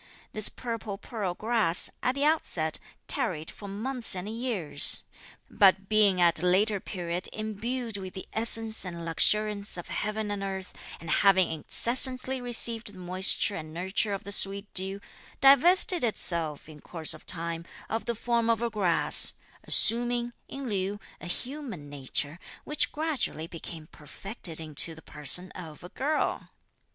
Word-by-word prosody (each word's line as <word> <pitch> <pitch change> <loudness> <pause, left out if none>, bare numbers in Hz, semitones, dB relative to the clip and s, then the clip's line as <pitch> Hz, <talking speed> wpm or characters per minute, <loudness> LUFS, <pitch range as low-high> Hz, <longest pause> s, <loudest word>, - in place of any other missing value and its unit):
This 215 -1 +4
purple 230 -4 -6
pearl 200 -5 -5
grass, 220 -6 +2
at 255 - 0
the 280 - -1
outset, 170 - 0 0.3
tarried 160 -3 -2
for 205 - -11
months 225 +3 +1
and 180 +2 -5
years; 220 - 0 0.4
but 195 -1 +3
being 210 -4 +3
at 170 -2 +4
a - - -2
later 200 +3 +2
period 175 -2 -2
imbued 220 +2 -4
with 190 -2 -8
the 190 - -8
essence 225 0 +2
and 170 -3 -7
luxuriance 205 +4 +1
of 175 - -8
heaven 215 0 -3
and 205 -1 -4
earth, 190 -1 -5 0.3
and 165 0 -6
having 190 -3 +4
incessantly 255 - +1
received 230 -2 +2
the - - -14
moisture 185 +3 0
and 155 0 -8
nurture 190 +4 -1
of 200 -1 -4
the 200 - -8
sweet 200 0 +3
dew, 190 +1 -1 0.4
divested 335 +5 +7
itself, 170 -10 -1
in 155 -1 -13
course 165 -3 -4
of - - -15
time, 170 -1 -4 0.2
of 225 +1 -3
the 235 - -2
form 235 +1 -1
of 230 0 +1
a 235 - -1
grass; 185 -6 +3 0.3
assuming, 240 +1 +3
in 275 -1 -7
lieu, 200 -1 -2 0.2
a - - -9
human 235 - -6
nature, 145 +3 -3 0.2
which 300 - -1
gradually 300 - -3
became 165 -1 -8
perfected 165 - -1
into 160 +1 -2
the 160 - -15
person 165 +5 -1
of 160 -4 -11
a 175 - -9
girl. 300 +8 -2
200 Hz, 150 wpm, -27 LUFS, 175-230 Hz, 0.4 s, divested